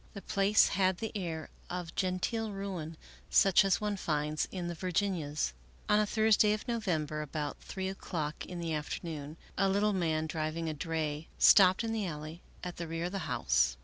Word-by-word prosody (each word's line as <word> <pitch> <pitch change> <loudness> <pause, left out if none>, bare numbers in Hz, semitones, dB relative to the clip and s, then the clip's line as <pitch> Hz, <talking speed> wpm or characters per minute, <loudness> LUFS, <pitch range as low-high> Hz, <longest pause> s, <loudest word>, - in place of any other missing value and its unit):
The 200 - -6
place 200 +1 +4
had 185 0 +2
the 220 +2 -4
air 165 -5 -4 0.2
of 175 -2 -4
genteel 205 +4 -1
ruin, 185 -5 -5 0.3
such 195 -1 +6
as 195 -2 +2
one 210 -1 -1
finds 150 -3 -1
in 180 -2 -4
the 175 - -3
Vir 180 +2 -4
ginias, 160 - 0 0.3
On 210 - +4
a 210 - +2
Thursday 215 -1 +4
of 215 +4 -4
November, 165 -10 -1
about 150 0 -4
three 190 -1 -5
o'clock 160 -5 -4
in 180 - -6
the 165 -1 -2
afternoon, 150 0 -4 0.2
a 195 0 +4
little 205 +2 +2
man, 160 -4 0
driving 160 +1 -2
a 155 - -1
dray, 155 -1 -3
stopped 190 +2 +7
in 225 0 -1
the 215 -4 -1
alley 155 +1 -6 0.2
at 180 -1 -5
the 170 - -4
rear 165 +1 -3
of 180 - -3
the 195 - -2
house. 65 - +2
175 Hz, 185 wpm, -32 LUFS, 155-195 Hz, 0.3 s, stopped